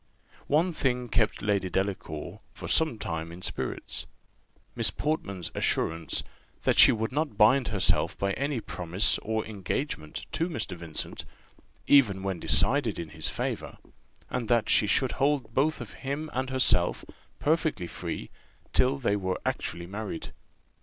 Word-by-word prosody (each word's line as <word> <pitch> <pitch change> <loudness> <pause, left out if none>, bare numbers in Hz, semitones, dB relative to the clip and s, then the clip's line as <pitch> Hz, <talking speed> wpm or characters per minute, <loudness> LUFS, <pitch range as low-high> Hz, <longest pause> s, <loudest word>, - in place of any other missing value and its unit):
One 165 +5 +2
thing 125 -4 -1
kept 110 -3 +1
Lady 100 -3 +1
Delacour 95 -5 -3 0.2
for - - -7
some 160 -8 +2
time 80 -4 -4
in 90 +2 -10
spirits - - -2 0.7
Miss - - +4
Portman's 100 - -3
assurance 80 0 0 0.4
that - - +3
she - - +10
would 110 0 -1
not 145 -5 -1
bind 120 +5 +5
herself 100 -4 +1
by 100 0 0
any 140 -1 -1
promise 90 0 +1
or 110 0 -2
engagement 100 - -4
to 165 +2 0
Mr. 160 - -3
Vincent, 85 -2 -4 0.6
even 105 -9 +5
when 95 -3 -2
decided 110 - +3
in 85 -2 -5
his 75 +1 -2
favour; - - -4 0.5
and 120 -3 -3
that 120 -1 +2
she 105 - +5
should 130 +5 +2
hold 135 -5 0
both 150 +5 +2 0.2
him 140 +3 -4
and 130 +1 -1
herself 130 -1 +3 0.3
perfectly 155 - +1
free - - -6 0.4
till 130 +2 +3
they 115 -6 +1
were 95 -2 -2
actually 85 0 -2
married. 100 -2 -6
110 Hz, 140 wpm, -28 LUFS, 90-135 Hz, 0.7 s, she